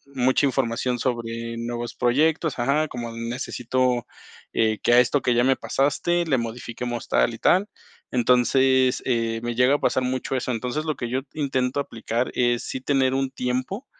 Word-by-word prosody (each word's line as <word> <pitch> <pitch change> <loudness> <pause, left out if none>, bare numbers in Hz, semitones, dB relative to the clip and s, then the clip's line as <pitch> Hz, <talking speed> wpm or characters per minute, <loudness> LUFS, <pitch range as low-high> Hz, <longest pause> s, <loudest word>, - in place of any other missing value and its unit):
mucha 130 +2 +3
información 125 -1 -1
sobre 115 -1 -3
nuevos 120 0 -4
proyectos, 150 +4 +1
ajá, 140 +5 +2
como: 120 -1 -5
“Necesito, 120 +1 -1 0.5
eh, 110 -1 +1
que 120 - +4
a 120 - +8
esto 125 +2 +1
que 125 - +1
ya 120 - +3
me 135 0 +4
pasaste 170 +5 0
le 140 -5 +2
modifiquemos 120 0 -5
tal - - +2
y - - -9
tal”. 195 +3 +3 0.4
Entonces, 125 +1 +3
eh, 115 -2 0
me 120 0 -2
llega 125 +3 +4
a - - -1
pasar 130 - +1
mucho 130 +1 -2
eso. 125 0 -2
Entonces, 125 +7 -3
lo 155 -2 -1
que 120 - -4
yo 130 - 0
intento 135 -3 -1
aplicar 115 -1 -3
es 120 -1 +1
sí - - -4
tener 135 -2 +2
un 135 0 0
tiempo, 130 - -3
125 Hz, 170 wpm, -24 LUFS, 120-135 Hz, 0.5 s, a